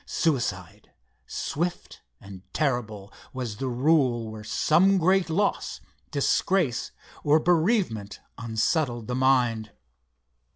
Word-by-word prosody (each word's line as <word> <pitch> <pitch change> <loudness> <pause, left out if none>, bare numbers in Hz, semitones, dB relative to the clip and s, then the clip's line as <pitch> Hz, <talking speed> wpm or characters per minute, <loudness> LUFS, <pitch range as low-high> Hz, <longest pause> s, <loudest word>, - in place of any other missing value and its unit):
Suicide, 145 -8 -2 0.4
swift 170 +3 -4 0.2
and 95 -2 -11
terrible, 110 -8 -2 0.2
was 120 -5 -5
the 135 - -3
rule 125 -3 +1
where 110 -1 -9
some 175 - +3
great 185 +1 +2
loss, 200 +6 -1 0.3
disgrace, 175 -11 +1 0.3
or 150 +2 +4
bereavement 165 - +1 0.2
unsettled 120 +2 -1
the 125 - -4
mind. 125 -4 +1
130 Hz, 95 wpm, -26 LUFS, 115-165 Hz, 0.4 s, or